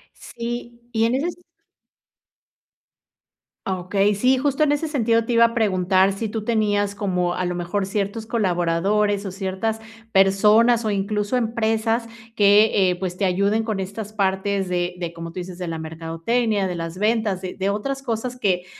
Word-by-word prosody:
Sí, 235 0 -7
y 225 -1 +2
en 235 +2 +1
eses 330 +6 -1 2.3
Okey, 195 +2 +1
sí, 250 +6 +3
justo 280 +2 0
en 305 -1 +4
ese 295 +2 -1
sentido 230 -6 +1
te 240 - -1
iba 230 0 +6
a 230 0 +2
preguntar 190 -3 +2
si 215 +3 -4
tú 220 0 -4
tenías 205 -3 +1
como 180 -3 -1
a 180 - -2
lo 180 0 -2
mejor 180 +3 -2
ciertos 205 +2 -3
colaboradores, 200 0 +1
o 195 - -4
ciertas 195 +3 -3 0.3
personas, 210 +5 +4
o 215 - +1
incluso 205 +3 -1
empresas 225 0 0 0.3
que, 205 -2 +5
eh, - - -1
pues, 180 -1 -4
te 200 - 0
ayuden 200 +4 +1
con 215 -3 -2
estas 200 +3 -6
partes 195 -1 0
de 175 0 -1
de 170 -2 -4
como 165 0 -7
tú 185 - -6
dices, 180 0 -7
de 180 -1 -5
la 165 -1 -4
mercadotecnia, 165 +7 -1
de 180 - -4
las 165 +1 -5
ventas, 215 -3 +1
de 185 -1 -6
de 195 +1 -1
otras 270 +7 -3
cosas 245 0 -3
que 180 -5 0
205 Hz, 170 wpm, -22 LUFS, 185-225 Hz, 2.3 s, iba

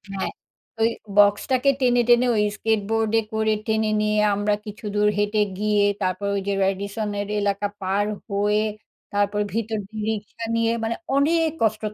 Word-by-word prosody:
হ্যাঁ। 190 - -2 0.5
ওই 225 - +4 0.3
বক্সটাকে 205 +6 +4
টেনে, 245 -1 +4
টেনে, 240 +1 +6
ওই 210 - +3
স্কেটবোর্ডে 225 0 +1
করে 220 0 +1
টেনে 220 0 +1
নিয়ে 210 0 +1 0.2
আমরা 205 +1 +1
কিছুদূর 210 -1 -1
হেঁটে 205 +1 +1 0.2
গিয়ে, 210 -1 +2 0.2
তারপর 185 +1 -1
ওই 200 - -1
যে 200 - +1
রেডিসনের 200 +1 -2
এলাকা 200 0 0
পার 195 +2 0 0.2
হয়ে, 205 +1 +1 0.5
তারপর 205 0 +1
ভিতর 220 -1 -2
দিয়ে 215 -1 -5
রিক্সা 220 +2 -6
নিয়ে, 230 0 +2
মানে 225 +1 -1 0.2
অনেক 320 +3 +3
কসরত 215 -1 0
210 Hz, 145 wpm, -23 LUFS, 205-225 Hz, 0.5 s, টেনে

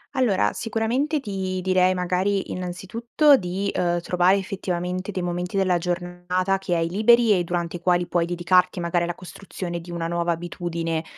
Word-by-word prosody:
Allora, 205 - +2
sicuramente 240 +7 -1
ti 190 -6 -3
direi 185 0 +3
magari, 185 +2 0
innanzitutto, 225 - +2
di, 190 0 -2
ehm, 175 -1 0
trovare 180 +2 +3
effettivamente 185 -1 -3
dei 185 - -3
momenti 175 +2 -3
della 185 -2 +2
giornata 175 +2 -1
che 190 -2 -2
hai 165 -1 +1
liberi 220 +2 +4
e 175 - 0
durante 170 0 -3
i - - -5
quali 175 0 +2
puoi 170 -1 +1
dedicarti 175 +1 +2
magari 170 0 0
alla 175 0 -2
costruzione 180 0 -7
di 170 +1 -10
una 170 -1 -3
nuova 170 0 0
abitudine, 165 -1 -3
180 Hz, 160 wpm, -24 LUFS, 175-195 Hz, -, liberi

